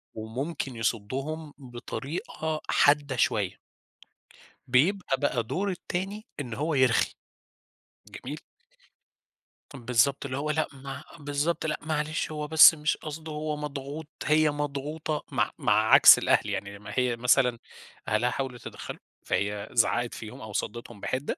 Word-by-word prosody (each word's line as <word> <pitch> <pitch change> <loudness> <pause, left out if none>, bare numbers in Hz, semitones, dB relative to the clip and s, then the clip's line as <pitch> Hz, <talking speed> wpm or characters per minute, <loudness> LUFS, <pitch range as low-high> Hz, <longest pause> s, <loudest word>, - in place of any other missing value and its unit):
وممكن 130 +5 -4
يصدّهم 135 +8 -3
بطريقة 150 - -5
حادّة 145 -2 +3
شوية. 105 -5 0 1.1
بيبقى 140 +4 +2
بقى 125 -4 0
دور 195 - -2
التاني 190 +3 -4
إن 125 -5 -5
هو 150 +7 -1
يرخِي، 130 -4 +3 0.9
جميل. - - -7 1.3
طَب 125 -5 -11
بالضبط، 125 +4 +2
اللي 130 -1 -3
هو 150 +2 -1
لأ، 155 +1 0
ما 135 0 -8 0.2
بالضبط، 145 +4 -1
لأ، 155 -1 -1
معلش 155 0 -2
هو 150 -1 -4
بس 160 +1 +9
مش 150 -1 -1
قصده، 155 +1 -7
هو 150 0 -3
مضغوط، 145 +1 -6 0.2
هي 155 0 +4
مضغوطة، 145 +1 -3
مع - - +1
مع - - +2 0.2
عكْس - - +10
الأهل. - - +2
يعني 100 0 -4
لمّا 105 +1 -10
هي 125 -1 +1
مثلًا 125 0 +3 0.5
أهلها 110 +3 +2
حاولوا 130 -1 -3
يتدخّلوا، 120 - -8 0.3
فهي 100 0 -1
زعّقِت 120 0 +2
فيهُم 110 -1 -8
أو 110 -1 -8
صدِّتهم 120 +1 -4
بحِدّة. 130 +7 -3
140 Hz, 130 wpm, -27 LUFS, 120-155 Hz, 1.3 s, عكْس